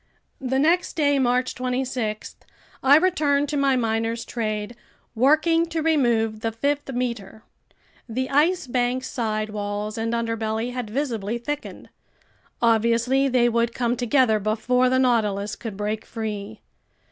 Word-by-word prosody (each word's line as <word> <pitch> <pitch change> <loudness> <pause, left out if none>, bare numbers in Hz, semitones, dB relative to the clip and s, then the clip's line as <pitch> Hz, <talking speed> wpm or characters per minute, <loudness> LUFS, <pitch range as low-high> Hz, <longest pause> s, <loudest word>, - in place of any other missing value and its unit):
The 265 0 -1
next 330 +6 +2
day, 285 -3 +2
March 250 0 +1
26, 250 -4 -3 0.5
I 275 +2 +7
returned 300 -5 +2
to 300 - -2
my 275 -2 +2
miner's 230 -1 -1
trade, 215 -1 -3 0.4
working 310 +7 +3
to 330 -1 -3
remove 235 -9 +2
the 225 +1 -2
fifth 280 +5 -2
meter. 235 -4 -4 0.7
The 260 +3 -2
Ice 315 +5 +2
Bank's 250 +1 -1
side 215 -4 -2
walls 210 +1 -4
and 225 +1 -1
underbelly 230 0 -2
had 245 -4 -4
visibly 230 -4 -2
thickened. 295 +5 -6 0.7
Obviously 235 +4 +3
they 250 -2 +3
would 235 0 0
come 240 -1 0
together 245 -2 +2
before 235 +5 +1
the 260 - +2
Nautilus 210 -5 +1
could 220 -4 -7
break 210 +1 -2
free. 215 -1 -6
240 Hz, 135 wpm, -23 LUFS, 220-270 Hz, 0.7 s, I